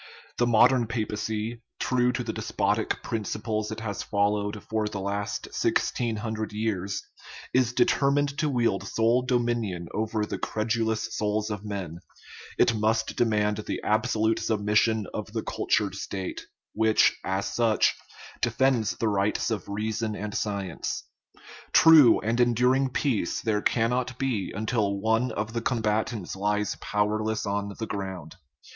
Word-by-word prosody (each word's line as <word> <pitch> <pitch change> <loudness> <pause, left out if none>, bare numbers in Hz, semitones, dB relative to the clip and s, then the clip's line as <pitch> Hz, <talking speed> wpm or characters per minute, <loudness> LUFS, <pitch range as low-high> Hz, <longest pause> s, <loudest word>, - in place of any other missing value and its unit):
The 120 - +3
modern 120 +1 +5
papacy, 110 0 -3 0.2
true 125 -1 +2
to - - -2
the - - -4
des - - -5
potic - - -1
principles 110 0 -2
it 110 - -5
has 105 -3 -3
followed 105 +1 0
for 110 -1 0
the 105 -2 -4
last 100 +1 -3
sixteen 115 -2 0
hun 110 +1 -3
dred 110 0 -4
years, 100 -3 -2 0.5
is 125 -2 +3
determined 140 +3 +2
to 155 - +1
wield 120 -7 +1
sole 115 +2 +2
dominion 120 -8 -1
over 110 0 -1
the - - -5
credulous 110 0 -1
souls 105 +1 -1
of 105 -1 -4
men; 95 -6 -5 0.6
it 120 - +4
must 110 +1 0
demand 105 -3 +1
the 105 - -4
absolute 110 0 +1
submission 105 0 +1
of - - -5
the - - -2
cultured - - 0
State, 95 -2 -5 0.3
which, 110 0 +3
as 95 +1 -1
such, 115 -3 +3 0.5
de - - +2
fends 130 -6 +1
the 115 - 0
rights 105 +2 0
of 105 -3 -3
reason 110 +1 -2
and 105 0 -5
science. 100 -5 -3 0.7
True 155 -8 +8
and 115 +3 +1
en 120 -1 +3
during 130 +3 +3
peace 125 - 0
there 105 -3 0
cannot 125 +3 0
be 125 -8 -1
until 105 -2 0
one 115 +4 +1
of 105 +1 -3
the 115 - -1
comba 110 -3 +1
tants 105 -8 -6
lies 105 +1 0
powerless 110 +1 0
on 100 0 -2
the 110 - -3
ground. 95 -6 -6
110 Hz, 150 wpm, -27 LUFS, 105-120 Hz, 0.7 s, True